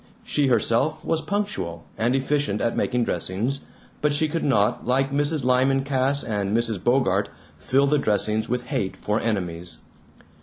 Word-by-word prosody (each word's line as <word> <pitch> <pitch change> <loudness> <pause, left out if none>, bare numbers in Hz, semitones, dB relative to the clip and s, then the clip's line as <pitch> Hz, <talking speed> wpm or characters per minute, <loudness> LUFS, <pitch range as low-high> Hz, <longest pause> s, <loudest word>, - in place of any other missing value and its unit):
She 145 -2 +1
herself 125 +6 +1
was 160 -1 0
punctual, 95 - -3
and 120 +4 +1
efficient 135 -6 0
at 115 - 0
making 125 -1 +1
dressings, 105 +9 -2 0.4
but 150 - +2
she 155 +2 +2
could 165 +2 -2
not, 105 -7 +2
like 135 +2 +2
Mrs. 145 +1 +1
Lyman 130 +2 +3
Cass 135 +1 +1
and 105 -1 -1
Mrs. 115 -4 -1
Bogart, 110 -6 +2 0.3
fill 135 +2 +2
the 145 +1 +2
dressings 110 -1 0
with 125 +1 -1
hate 95 -5 -2
for 105 +1 -1
enemies. 90 -6 -2
125 Hz, 155 wpm, -24 LUFS, 105-140 Hz, 0.4 s, Lyman